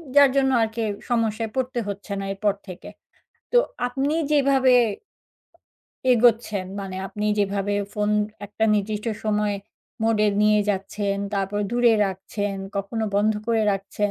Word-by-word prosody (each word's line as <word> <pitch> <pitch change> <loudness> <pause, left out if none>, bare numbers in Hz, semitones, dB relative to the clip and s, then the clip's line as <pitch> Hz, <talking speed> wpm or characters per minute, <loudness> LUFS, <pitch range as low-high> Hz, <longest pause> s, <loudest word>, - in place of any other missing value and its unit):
যার 285 -1 +8
জন্য 270 -1 +3
আর 225 - +3
কি 230 - -1 0.3
সমস্যায় 225 -2 0
পড়তে 255 -1 -1
হচ্ছে 200 +1 -6
না 195 - -4
এরপর 200 +1 0
থেকে। 185 -1 -9 0.6
তো - - +5 0.3
আপনি 270 +4 -1 0.2
যেভাবে, 270 -3 +4 1.4
এগোচ্ছেন। 225 -4 +3 0.2
মানে 190 -1 -6
আপনি 210 +2 -4
যেভাবে 200 0 0 0.2
phone 210 0 0 0.3
একটা 210 +2 -1
নির্দিষ্ট 210 +1 -2 0.2
সময় 210 -1 +1 0.5
mode 220 -1 +3 0.2
নিয়ে 210 0 +4
যাচ্ছেন। 200 +1 -2 0.2
তারপর 200 +1 -1
দূরে 240 -1 +4
রাখছেন, 195 +2 -4 0.2
কখনো 210 +3 -2
বন্ধ 210 +2 +3
করে 225 -1 +2
রাখছেন 200 +1 -2
210 Hz, 130 wpm, -24 LUFS, 200-235 Hz, 1.4 s, যার